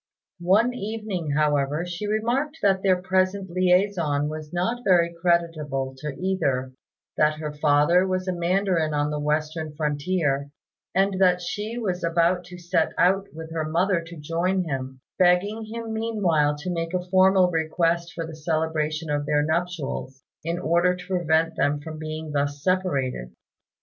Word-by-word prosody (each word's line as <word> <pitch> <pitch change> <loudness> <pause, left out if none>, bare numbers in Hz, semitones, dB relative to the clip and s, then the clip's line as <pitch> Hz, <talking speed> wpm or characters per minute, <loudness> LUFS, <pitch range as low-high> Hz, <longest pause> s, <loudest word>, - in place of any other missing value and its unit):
One 220 +7 +4
evening, 205 - -4
however, 150 +1 +1
she 175 +4 -5
remarked 240 +8 0
that 195 -2 +3
their 185 -2 +3
present 185 0 0
liaison 180 -5 +2
was 155 0 -7
not 225 +8 -1
very 170 -4 +3
creditable 165 -6 0
to 150 -1 -5
either; 140 -9 -1 0.4
that 150 0 +3
her 155 -1 -4
father 150 +5 +3
was 185 0 -2
a 185 - 0
mandarin 175 -3 +1
on 145 0 0
the 150 - -2
western 155 +1 -2
frontier, 145 -1 -1 0.5
and 195 0 +2
that 180 -1 +5
she 210 +6 -4
was 185 -6 -2
about 170 +1 +2
to 180 0 -10
set 175 -2 0
out 195 +2 +3
with 160 0 -9
her 160 -1 -2
mother 175 +2 +2
to 165 0 -11
join 170 +5 0
him; 130 -4 -5 0.2
begging 190 +5 +3
him 225 0 -6
meanwhile 190 -10 +1
to 175 +5 -4
make 165 +1 -3
a 180 0 -2
formal 190 -1 +5
request 170 +1 0
for 165 - -3
the 160 0 -8
celebration 155 -1 -1
of 145 0 -1
their 150 0 +2
nuptials, 155 -5 -3 0.2
in 170 +2 -2
order 175 +2 +2
to 180 0 -10
prevent 165 -3 +1
them 145 -2 +1
from 155 +1 -8
being 155 0 -5
thus 145 0 -2
separated. 135 - -1
170 Hz, 155 wpm, -24 LUFS, 150-185 Hz, 0.5 s, that